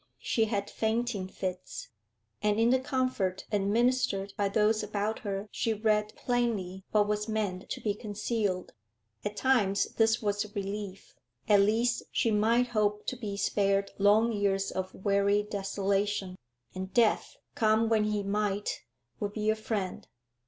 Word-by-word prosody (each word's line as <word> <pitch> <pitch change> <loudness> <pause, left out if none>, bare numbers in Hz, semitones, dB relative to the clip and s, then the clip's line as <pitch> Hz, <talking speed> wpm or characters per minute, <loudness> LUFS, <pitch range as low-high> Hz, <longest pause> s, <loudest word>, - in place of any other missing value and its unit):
She 225 - +1
had 205 -2 -2
fainting 220 -3 -1
fits, 185 -1 -5 0.5
and 210 +1 +2
in 230 +1 +4
the 260 - +4
comfort 255 -9 -1
administered 205 -1 +1
by 205 -2 +1
those 215 +2 +2
about 210 +1 -2
her 200 -1 -4
she 225 -1 0
read 215 0 +1
plainly 215 -7 -1
what 210 -1 +3
was 210 +1 -1
meant 205 -4 -2
to - - -3
be 210 - 0
concealed. 205 -2 -2 0.5
At 205 0 -4
times 210 -7 +3
this 225 0 +4
was 205 -1 0
a - - -8
relief; 200 -1 -5 0.3
at 205 -2 +6
least 225 +4 +2
she 230 - +1
might 230 +4 +3
hope 210 -2 0
to - - -2
be 210 -5 -5
spared 200 0 +1
long 210 +3 +5
years 200 -2 0
of 185 0 -3
weary 200 +1 +2
desolation, 200 -1 -1 0.4
and 185 +1 -5
death, 230 -3 +2 0.2
come 220 0 +3
when 220 -1 +3
he 210 -1 0
might, 205 0 -1 0.4
would 205 0 -3
be 215 0 +1
a - - 0
friend. 210 -4 -3
210 Hz, 150 wpm, -30 LUFS, 200-220 Hz, 0.5 s, at